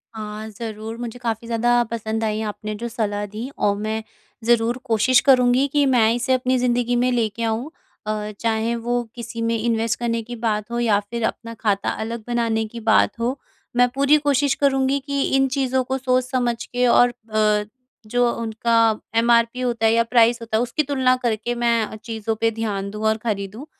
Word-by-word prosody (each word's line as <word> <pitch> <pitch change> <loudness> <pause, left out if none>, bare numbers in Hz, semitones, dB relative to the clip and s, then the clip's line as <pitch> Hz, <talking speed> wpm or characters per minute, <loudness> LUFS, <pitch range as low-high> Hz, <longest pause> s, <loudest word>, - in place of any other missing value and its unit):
हाँ 215 0 -6
ज़रूर 220 +1 -7
मुझे 240 0 -6
काफ़ी 230 -1 -3
ज़्यादा 240 +1 +2
पसंद 220 -1 -3
आईं 215 0 -1
आपने 215 0 -5
जो 235 +3 -5
सलाह 205 -3 -2
दीं 215 +6 -6 0.2
और 200 -1 +3
मैं 215 +1 -3 0.4
ज़रूर 235 +1 +2
कोशिश 240 +2 +4
करूँगी 250 +1 +5
कि 290 -1 +3
मैं 235 -4 +4
इसे 245 +2 0
अपनी 255 0 +1
ज़िंदगी 245 0 +1
में 250 +1 +2
लेके 230 -2 -1
आऊँ 225 +5 -1 0.4
अ, 210 0 -2
चाहे 225 0 0
वो 240 +1 -1
किसी 235 -1 -6
में 230 0 0
इन्वेस्ट 230 +1 0
करने 230 -1 -1
की 240 +2 -7
बात 220 -1 -2
हो 235 - -1
या 220 -4 +3
फिर 235 -1 -3
अपना 230 0 -6
खाता 205 -3 0
अलग 225 0 -4
बनाने 230 -2 0
की 235 +2 -9
बात 225 +1 +2
हो। 245 +4 -1 0.4
मैं 245 0 +5
पूरी 280 +2 +4
कोशिश 285 -1 +2
करूँगी 270 0 +2
कि 280 -1 -1
इन 270 0 +3
चीज़ों 260 -1 0
को 265 +1 -2
सोच 255 -1 +1
समझ 240 -2 -1
के 250 0 0
और 245 +1 +5
अ, 215 -3 0 0.4
जो 245 +1 +2
उनका 225 -1 +1 0.2
एमआरपी 235 +1 +3
होता 235 -3 0
है 220 - +5
या 230 0 +4
प्राइस 235 0 +3
होता 225 -1 -1
है - - +1
उसकी 245 +5 -1
तुलना 260 -2 +2
करके 235 +1 -1
मैं, 235 -2 0
चीज़ों 225 -1 -4
पे 225 0 +3
ध्यान 210 -3 -3
दूँ 210 +1 -5
और 220 - +2
खरीदूँ। 215 +2 -4
230 Hz, 190 wpm, -22 LUFS, 220-245 Hz, 0.4 s, करूँगी